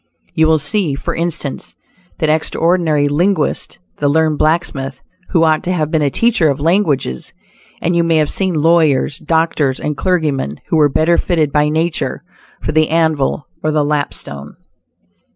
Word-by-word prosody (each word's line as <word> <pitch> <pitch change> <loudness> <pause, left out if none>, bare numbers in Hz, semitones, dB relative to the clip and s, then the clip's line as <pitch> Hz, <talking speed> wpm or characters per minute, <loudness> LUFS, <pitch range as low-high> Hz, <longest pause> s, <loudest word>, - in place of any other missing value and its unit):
You 160 0 +3
will 160 0 +4
see, 175 -3 0
for - - -4
instance, 165 -4 -4 0.4
that 155 - 0
extraordinary 160 -1 +1
linguist 175 +7 -1 0.2
the 145 - +1
"learned 155 0 +1
blacksmith," 145 -5 -1 0.3
who 165 -3 +2
ought 155 -1 +3
to 180 - -1
have 155 -4 -1
been 160 -2 +1
a 145 - +2
teacher 215 - +2
of 140 - -1
languages; 150 - 0 0.5
and 175 +1 +1
you 170 - +3
may 165 -1 +1
have 155 -2 +2
seen 190 -3 0
lawyers, 155 -3 +2
doctors 160 -5 0
and 150 - -3
clergymen 150 - -1
who 165 - +2
were 150 -1 +4
better 160 +5 +2
fitted 160 -5 0
by 150 +1 +2
nature 160 +2 -2 0.4
for - - -1
the 155 0 +2
anvil 160 -3 0 0.2
or 155 - 0
the 150 -1 +1
lapstone. 110 - -4
155 Hz, 160 wpm, -16 LUFS, 145-170 Hz, 0.5 s, will